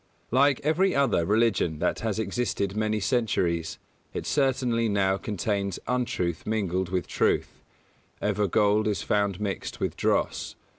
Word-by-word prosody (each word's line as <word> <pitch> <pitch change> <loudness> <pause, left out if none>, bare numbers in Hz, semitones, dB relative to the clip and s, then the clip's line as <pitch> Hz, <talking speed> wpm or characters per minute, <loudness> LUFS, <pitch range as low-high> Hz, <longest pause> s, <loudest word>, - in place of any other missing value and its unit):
Like 135 +2 +4
every 175 +6 +2
other 130 -12 +2
religion 105 -7 +2
that - - 0
has 110 -2 -2
existed 100 -2 -1
many 110 0 0
centuries, 95 -7 0 0.4
it - - -3
certainly 125 -5 +1
now 95 -1 +2
contains 100 -1 -2
untruth 120 -9 -1
mingled 95 -4 -1
with 90 -1 -1
truth; - - 0 0.6
ever 105 0 0
gold 105 +2 +2
is 105 -2 -1
found 100 -3 0
mixed 100 -2 -4
with - - -2
dross. - - 0
105 Hz, 135 wpm, -27 LUFS, 95-115 Hz, 0.6 s, Like